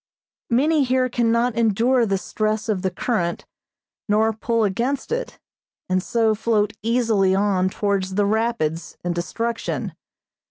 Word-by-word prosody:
Many 290 Hz, +5 st, +3 dB
here 255 Hz, 0 st, +1 dB
cannot 235 Hz, 0 st, +1 dB
endure 235 Hz, +2 st, +2 dB
the 195 Hz, -1 st, +1 dB
stress 215 Hz, +2 st, -2 dB
of 200 Hz, -4 st, 0 dB
the 190 Hz, -, 0 dB
current, 180 Hz, -2 st, -2 dB, 0.6 s
nor 220 Hz, +2 st, +3 dB
pull 230 Hz, +1 st, 0 dB
against 240 Hz, -, -1 dB
it, -, -, -3 dB, 0.5 s
and 185 Hz, 0 st, +1 dB
so 225 Hz, +2 st, +1 dB
float 210 Hz, -1 st, 0 dB
easily 220 Hz, -4 st, +2 dB
on 195 Hz, -2 st, +2 dB
towards 195 Hz, -1 st, -1 dB
the 205 Hz, 0 st, +2 dB
rapids 205 Hz, -7 st, -1 dB
and 175 Hz, 0 st, -1 dB
destruction. 230 Hz, +7 st, -3 dB
220 Hz, 130 wpm, -22 LUFS, 195-235 Hz, 0.6 s, Many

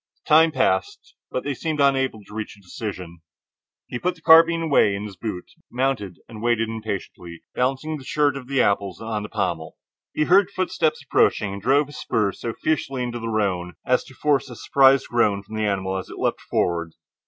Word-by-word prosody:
The -, -, -15 dB
time 160 Hz, +1 st, +6 dB
passed, 415 Hz, -, -1 dB, 0.2 s
but 130 Hz, -, -3 dB
they 145 Hz, -, -2 dB
seemed 155 Hz, +3 st, -3 dB
unable 135 Hz, -6 st, +2 dB
to 105 Hz, -, -15 dB
reach 110 Hz, -1 st, -6 dB
a -, -, -18 dB
decision. 90 Hz, -3 st, -7 dB, 0.7 s
He 120 Hz, -, -5 dB
put 180 Hz, +5 st, -1 dB
the 165 Hz, -, -21 dB
carbine 165 Hz, +1 st, +6 dB
away 140 Hz, -10 st, +3 dB
in 100 Hz, +2 st, -5 dB
its 100 Hz, -2 st, -8 dB
boot, 95 Hz, -2 st, -6 dB, 0.2 s
mounted, 120 Hz, -8 st, -1 dB
and 110 Hz, -2 st, -10 dB
waited 115 Hz, -1 st, +1 dB
impatiently, 100 Hz, -6 st, -6 dB
balancing 135 Hz, +5 st, -1 dB
the 135 Hz, -, -11 dB
shirt 145 Hz, +1 st, +1 dB
of 135 Hz, -2 st, -8 dB
apples 100 Hz, -7 st, +1 dB
on 110 Hz, -1 st, -3 dB
the 105 Hz, -, -7 dB
pommel. 85 Hz, -7 st, -3 dB, 0.4 s
He 155 Hz, -, +2 dB
heard 190 Hz, +4 st, +4 dB
footsteps 170 Hz, -5 st, -1 dB
approaching, 105 Hz, -6 st, +2 dB
and 100 Hz, -, -7 dB
drove 135 Hz, +7 st, +3 dB
his 145 Hz, +1 st, -11 dB
spurs 105 Hz, -4 st, -1 dB
so 115 Hz, -, -2 dB
fiercely 135 Hz, -4 st, -1 dB
into 120 Hz, -1 st, -4 dB
the 115 Hz, -, -5 dB
roan 95 Hz, -5 st, -1 dB
as 125 Hz, -, +2 dB
to 130 Hz, -, -15 dB
force 140 Hz, -2 st, +1 dB
a 120 Hz, -, -9 dB
surprised 135 Hz, +2 st, +4 dB
groan 105 Hz, -4 st, +1 dB
from 110 Hz, -, -9 dB
the 110 Hz, -1 st, 0 dB
animal 95 Hz, -1 st, -1 dB
as 95 Hz, -, -5 dB
it -, -, -9 dB
leaped -, -, -1 dB
forward. 85 Hz, -2 st, -1 dB
120 Hz, 200 wpm, -23 LUFS, 100-145 Hz, 0.7 s, time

